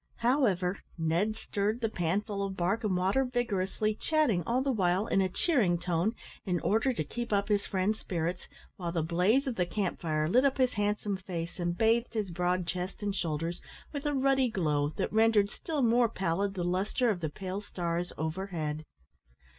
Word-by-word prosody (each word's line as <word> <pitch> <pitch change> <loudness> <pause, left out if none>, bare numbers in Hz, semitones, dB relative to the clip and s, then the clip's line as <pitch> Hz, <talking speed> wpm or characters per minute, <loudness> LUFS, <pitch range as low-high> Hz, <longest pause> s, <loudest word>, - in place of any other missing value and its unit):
However, 220 -8 +2 0.2
Ned 170 +7 +1
stirred 210 +1 -1
the 230 - +1
panful 200 +2 -1
of 195 -1 -4
bark 195 +7 0
and 195 -4 +1
water 190 +9 +2
vigorously, 215 -4 0
chatting 270 - +2
all 250 +3 +2
the 275 - +1
while 190 -3 +2
in 195 - +2
a 190 - +1
cheering 205 - +2
tone, 180 +5 0 0.3
in 180 -3 0
order 225 +6 +2
to 215 -11 -2
keep 235 +10 -5
up 200 0 +1
his 205 -1 +1
friend's 200 +3 0
spirits, 175 0 -3 0.3
while 175 -2 -3
the 165 -2 0
blaze 180 - +2
of 255 -4 -3
the 180 - +2
camp 195 -1 -2
fire 155 -2 0
lit 250 +10 +4
up 275 -1 +2
his 255 -2 +2
handsome 205 -1 0
face 175 -2 -5
and 175 0 -1
bathed 230 +2 +2
his 210 -4 -1
broad 180 +1 0
chest 180 +4 -4
and 200 -1 -1
shoulders 165 0 -2 0.3
with 285 0 -3
a 290 - 0
ruddy 270 -1 +3
glow 150 -8 +1
that 195 - -1
rendered 220 -2 +4
still 305 -5 -2
more 235 0 +4
pallid 195 0 -1
the 180 - -2
lustre 195 +7 +1
of 190 - -2
the 160 -2 -2
pale 190 +4 -5
stars 175 -3 -3
overhead. 160 -2 -3
195 Hz, 185 wpm, -30 LUFS, 175-225 Hz, 0.3 s, lit